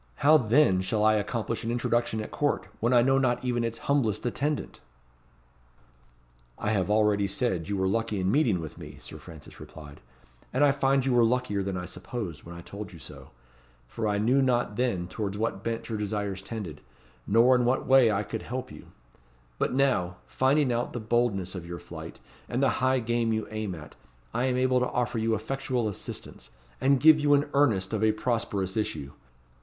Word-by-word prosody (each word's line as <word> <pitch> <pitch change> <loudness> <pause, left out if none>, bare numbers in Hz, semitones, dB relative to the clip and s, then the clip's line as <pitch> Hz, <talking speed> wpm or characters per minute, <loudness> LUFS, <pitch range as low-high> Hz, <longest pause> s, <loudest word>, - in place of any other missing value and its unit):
How 155 +2 +8
then 120 -6 +4
shall 105 +3 -1
I 110 - +5
accomplish 110 +2 -2
an 115 - -3
introduction 120 -2 0
at 105 - -7
Court, 145 -1 0
when 115 +2 +1
I 120 -1 +5
know 135 +1 +3
not 125 -1 0
even 120 -1 0
its 115 0 -3
humblest 125 -6 +1
attendant?" 140 +5 -2 1.8
"I 105 - -1
have 100 -2 0
already 105 -1 +3
said 95 -6 -2
you 100 - -1
were 95 - 0
lucky 110 +1 -1
in 95 +1 +1
meeting 115 - +2
with 80 -2 -8
me," - - -10
Sir - - -10
Francis 80 -3 -13
replied; 75 -1 -12 0.5
"and 130 +3 +2
I 145 - +6
find 135 -1 +1
you 130 - +1
were 120 -1 +5
luckier 115 -4 +1
than 95 -1 -3
I 90 - -4
supposed, 90 -3 -6
when 85 +1 -10
I 85 - -9
told 100 +2 -8
you 85 - -11
so; 80 - -12 0.6
for 110 - -3
I 105 -1 +1
knew 125 +6 +3
not 125 -5 +1
then 115 -8 -1
towards 100 +1 -4
what 110 -2 -2
bent 115 -1 -3
your 110 -2 -3
desires 105 -2 -3
tended, 95 -7 -7 0.5
nor 115 +5 +5
in 125 - +2
what 125 +2 +1
way 130 -4 +6
I 100 0 0
could 110 +1 -5
help 130 +1 -5
you; - - -12 0.7
but - - +1
now, 130 -10 +1
finding 135 0 +2
out 120 +1 -2
the 120 - -3
boldness 110 -5 0
of 90 -3 -6
your 85 0 -6
flight, - - -9 0.3
and 125 +3 0
the 135 - +4
high 130 0 +2
game 115 0 0
you 110 -1 -1
aim 110 -4 -3
at, 75 -2 -11 0.4
I 120 +3 0
am 125 -1 +1
able 130 0 +3
to 125 - 0
offer 120 -1 -1
you 110 0 +1
effectual 125 +1 -2
assistance, 100 - -7 0.3
and 135 0 +4
give 155 +1 +7
you 145 -1 +4
an 145 +1 0
earnest 115 -9 +2
of 110 0 0
a 110 -1 +4
prosperous 105 -5 -2
issue. 75 -10 -3
115 Hz, 195 wpm, -27 LUFS, 100-125 Hz, 1.8 s, How